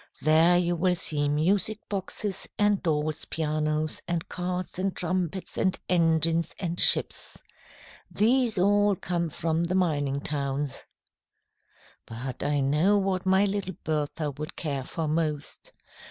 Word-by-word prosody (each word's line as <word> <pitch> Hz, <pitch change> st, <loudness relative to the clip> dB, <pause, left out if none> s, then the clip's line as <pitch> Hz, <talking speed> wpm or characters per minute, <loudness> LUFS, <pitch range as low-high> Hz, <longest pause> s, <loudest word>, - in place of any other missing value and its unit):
There 160 Hz, +3 st, +5 dB
you 175 Hz, 0 st, +1 dB
will 180 Hz, +1 st, +2 dB
see 145 Hz, -3 st, +1 dB
music 185 Hz, +8 st, +1 dB
boxes 195 Hz, 0 st, -2 dB
and 205 Hz, -1 st, +2 dB
dolls' 155 Hz, -1 st, -1 dB
pianos 155 Hz, 0 st, -1 dB
and 170 Hz, -1 st, -2 dB
carts 180 Hz, 0 st, -4 dB
and 190 Hz, 0 st, -1 dB
trumpets 180 Hz, +1 st, -3 dB
and 185 Hz, -2 st, +1 dB
engines 165 Hz, -1 st, +2 dB
and 175 Hz, -2 st, -3 dB
ships. -, -, +4 dB, 0.7 s
These 235 Hz, 0 st, +2 dB
all 205 Hz, +2 st, +3 dB
come 170 Hz, -2 st, -2 dB
from 165 Hz, +2 st, -1 dB
the 180 Hz, +2 st, -2 dB
mining 145 Hz, -6 st, 0 dB
towns. 140 Hz, -1 st, -3 dB, 1.2 s
"But 125 Hz, +3 st, -6 dB
I 145 Hz, 0 st, 0 dB
know 155 Hz, +9 st, +3 dB
what 190 Hz, -2 st, -1 dB
my 190 Hz, +2 st, +4 dB
little 195 Hz, -2 st, -3 dB
Bertha 150 Hz, 0 st, -2 dB
would 150 Hz, +3 st, -7 dB
care 140 Hz, -5 st, -3 dB
for 160 Hz, +2 st, -4 dB
most. 155 Hz, -2 st, -3 dB
165 Hz, 130 wpm, -27 LUFS, 150-185 Hz, 1.2 s, There